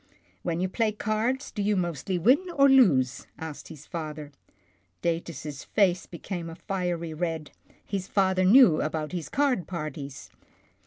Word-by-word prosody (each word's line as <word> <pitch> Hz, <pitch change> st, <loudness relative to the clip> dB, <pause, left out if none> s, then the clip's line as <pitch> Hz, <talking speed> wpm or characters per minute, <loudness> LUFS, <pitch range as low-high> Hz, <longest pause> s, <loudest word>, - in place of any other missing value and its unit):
When 170 Hz, -1 st, -2 dB
you 185 Hz, -, +1 dB
play 215 Hz, +3 st, 0 dB
cards, 220 Hz, +6 st, -1 dB
do 210 Hz, -, -3 dB
you 205 Hz, +1 st, +2 dB
mostly 175 Hz, 0 st, -1 dB
win 255 Hz, -, +4 dB
or 275 Hz, 0 st, +6 dB
lose? 155 Hz, -, +4 dB
" -, -, -38 dB
asked 160 Hz, -2 st, -7 dB
his 155 Hz, -2 st, -11 dB
father. 155 Hz, -3 st, -6 dB, 0.7 s
Datus' 165 Hz, -4 st, -3 dB
face 185 Hz, -3 st, +1 dB
became 170 Hz, 0 st, -6 dB
a 165 Hz, -, -8 dB
fiery 175 Hz, -3 st, -3 dB
red. 160 Hz, -2 st, -3 dB, 0.3 s
His 195 Hz, -2 st, -3 dB
father 190 Hz, -2 st, +2 dB
knew 195 Hz, -, +7 dB
about 155 Hz, 0 st, -2 dB
his 170 Hz, -5 st, -4 dB
card 270 Hz, -, +1 dB
parties. 150 Hz, -5 st, -6 dB
175 Hz, 150 wpm, -27 LUFS, 155-205 Hz, 0.7 s, knew